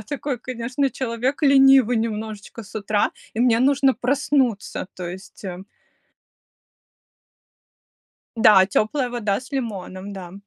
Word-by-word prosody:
Я - - -8
такой, 275 +2 -4
конечно, 255 +3 -2
человек 255 +4 -3
ленивый 270 -4 +5
немножечко 220 0 -4
с 200 - -16
утра, 205 -1 0 0.2
и 220 - -3
мне 240 -2 +4
нужно 270 0 +3
проснуться. 255 -4 0
То 180 -2 -6
есть, 190 +3 -11
э 185 -1 -6 2.7
Да, 210 -4 +6
теплая 245 +6 0
вода 215 -4 -1
с 255 +2 -15
лимоном, 200 -6 -5
да. 185 -3 -9
230 Hz, 120 wpm, -22 LUFS, 205-265 Hz, 2.7 s, Да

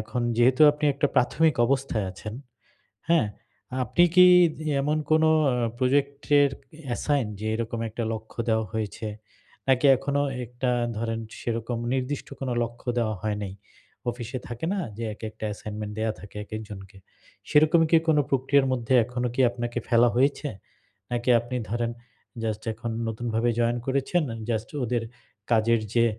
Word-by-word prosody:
এখন 110 +3 -3 0.2
যেহেতু 130 +5 +4
আপনি 150 +1 -4
একটা 140 +1 +2
প্রাথমিক 155 +5 +3
অবস্থায় 130 -6 0
আছেন, 105 +4 -8 0.8
হ্যাঁ? 165 -9 +4 0.6
আপনি 175 +9 +4
কি 180 0 +9 0.6
এমন 150 +2 +1
কোন 155 0 +4 0.3
আ - - +1 0.2
প্রজেক্ট 140 +2 +1 0.2
এর 140 - +4 0.4
অ্যাসাইন? 135 +1 0
যে 110 - -4
এরকম 115 0 -3
একটা 115 +2 -4
লক্ষ্য 110 +1 -8
দেওয়া 110 -1 +1
হয়েছে। 110 0 -4 0.6
নাকি 130 +2 +4
এখনো 140 +2 -1 0.2
একটা 125 +2 -2 0.3
ধরেন 115 0 -2 0.2
সেরকম 115 0 -3 0.2
নির্দিষ্ট 135 +2 -3
কোন 135 - -3
লক্ষ্য 120 +2 -6
দেওয়া 110 -2 0
হয় 105 -1 -1
নাই। 95 -2 -5 0.6
অফিসে 120 +1 -6
থাকে 120 +5 -5
না? 200 - -1 0.2
যে, 115 - -3
একেকটা 110 0 -7
অ্যাসাইনমেন্ট 105 0 -6
দেয়া 110 0 0
থাকে 105 0 -12
একেকজনকে। 105 -2 -8 0.5
সেরকমই 155 +2 +5
কি 165 - +8
কোন 155 - +5
প্রক্রিয়ার 135 +1 +3
মধ্যে 125 0 0
এখনো 125 +1 -2
কি 135 - -1
আপনাকে 120 0 -4
ফেলা 120 0 +5
হয়েছে? 140 +3 +2 0.6
নাকি 120 +1 -2
আপনি 120 +2 -5
ধরেন 120 0 -1 0.5
জাস্ট 110 -1 -2
এখন 115 +1 -5 0.2
নতুনভাবে 115 +1 -1
জয়েন 120 +1 +1
করেছেন। 140 +5 +1 0.3
জাস্ট 110 -1 -1 0.2
ওদের 120 0 -1 0.5
কাজের 115 +1 +3
যে 115 - +5
120 Hz, 145 wpm, -26 LUFS, 110-135 Hz, 0.8 s, কি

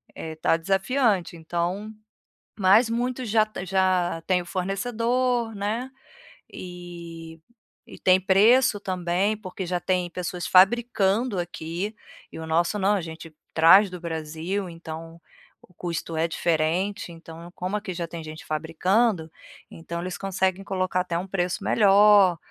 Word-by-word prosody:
eh, 160 - -6
está 160 +1 +1
desafiante, 195 +1 +1
então 175 +6 -3 0.7
Mas 205 +5 +5
muitos 245 +1 -2
já 215 0 +4
t 215 -3 -7
já 185 -3 +1
têm 180 -1 +2
o - - -15
fornecedor, 230 +5 -1
né, 220 +6 -3 0.6
eh, - - -10 1.3
e - - -11
tem 185 0 +5
preço 210 +6 +4
também, 185 +3 -1
porque 190 -2 -7
já 180 0 -1
tem 180 -1 -1
pessoas 180 0 -5
fabricando 210 +1 +3
aqui. 175 +4 -4 0.4
E - - -9
o 160 - -6
nosso 170 +5 +1
não; 200 +1 +2
a 190 - -1
gente 160 0 -9 0.2
traz 190 +6 +7
do 180 -1 -8
Brasil, 165 +4 -4
então 165 0 -9 0.4
o 180 - -22
custo 165 -2 -4
é 160 +1 +1
diferente. 170 +5 -1
Então, 165 +1 -11
como 185 +3 -2
aqui 205 -3 -5
já 170 -1 -3
tem 165 0 -7
gente 155 0 -9
fabricando, 165 +3 0 0.4
então 170 +1 -6
eles 180 0 -5
conseguem 190 0 -1
colocar 185 -1 -1
até 175 -2 -3
um 175 - -3
preço 180 -2 -2
melhor. 200 -3 +5
185 Hz, 140 wpm, -25 LUFS, 170-205 Hz, 1.3 s, traz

